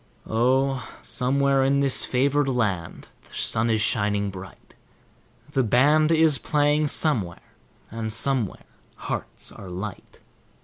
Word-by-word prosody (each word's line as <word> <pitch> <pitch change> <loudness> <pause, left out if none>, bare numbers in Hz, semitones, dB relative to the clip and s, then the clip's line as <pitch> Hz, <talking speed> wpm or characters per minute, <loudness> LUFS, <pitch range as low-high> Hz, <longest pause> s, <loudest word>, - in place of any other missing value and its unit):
Oh! 130 +2 0
somewhere 135 +1 +1
in 140 +1 +2
this 140 -2 +2
favored 140 +3 +1
land 105 -10 -2 0.2
the - - -14
sun 110 +1 0
is 110 -1 +1
shining 105 -2 0
bright; 95 0 -12 0.8
The 135 - +1
band 145 +7 +3
is 160 -3 +3
playing 150 0 +1
somewhere, 110 - 0 0.4
and 110 0 -4
somewhere 115 -1 0 0.3
hearts - - -6
are 95 - -11
light. 95 +3 -8
125 Hz, 120 wpm, -24 LUFS, 105-140 Hz, 0.8 s, band